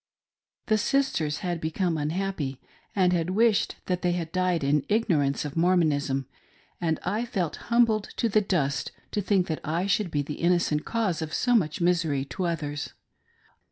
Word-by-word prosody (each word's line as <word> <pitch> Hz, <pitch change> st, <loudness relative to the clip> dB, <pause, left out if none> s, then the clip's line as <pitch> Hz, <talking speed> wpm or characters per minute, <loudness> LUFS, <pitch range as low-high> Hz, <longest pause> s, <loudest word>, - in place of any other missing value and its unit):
The 215 Hz, 0 st, +2 dB
sisters 200 Hz, -, 0 dB, 0.2 s
became 165 Hz, +2 st, -1 dB
unhappy, 155 Hz, -3 st, -2 dB, 0.4 s
and 180 Hz, -3 st, +2 dB
wished 215 Hz, +2 st, +2 dB
that 180 Hz, -1 st, -1 dB
they 175 Hz, -1 st, +1 dB
had 165 Hz, -2 st, -3 dB
died 185 Hz, -3 st, +1 dB
in 140 Hz, +1 st, +2 dB
ignorance 155 Hz, -11 st, +1 dB
of 145 Hz, -, -5 dB
Mormonism; 155 Hz, -6 st, +2 dB, 0.6 s
and 160 Hz, -2 st, 0 dB
I 210 Hz, +6 st, 0 dB
felt 195 Hz, -9 st, -2 dB
humbled 230 Hz, -3 st, +3 dB
to 235 Hz, -, +2 dB
the 215 Hz, 0 st, +3 dB
dust 145 Hz, -9 st, 0 dB, 0.2 s
to 205 Hz, -, 0 dB
think 195 Hz, -2 st, +2 dB
that 160 Hz, -3 st, -3 dB
I 165 Hz, +4 st, -1 dB
should 200 Hz, -1 st, +1 dB
be 145 Hz, -2 st, 0 dB
the 150 Hz, +1 st, -6 dB
inno 175 Hz, +1 st, +4 dB
cent 150 Hz, -3 st, -1 dB
cause 215 Hz, -9 st, -1 dB
of 155 Hz, -1 st, -3 dB
so 245 Hz, -, +2 dB
much 175 Hz, -8 st, +1 dB
misery 165 Hz, -6 st, +1 dB
to 180 Hz, +6 st, -4 dB
others. 145 Hz, -4 st, -3 dB
175 Hz, 160 wpm, -27 LUFS, 150-195 Hz, 0.6 s, inno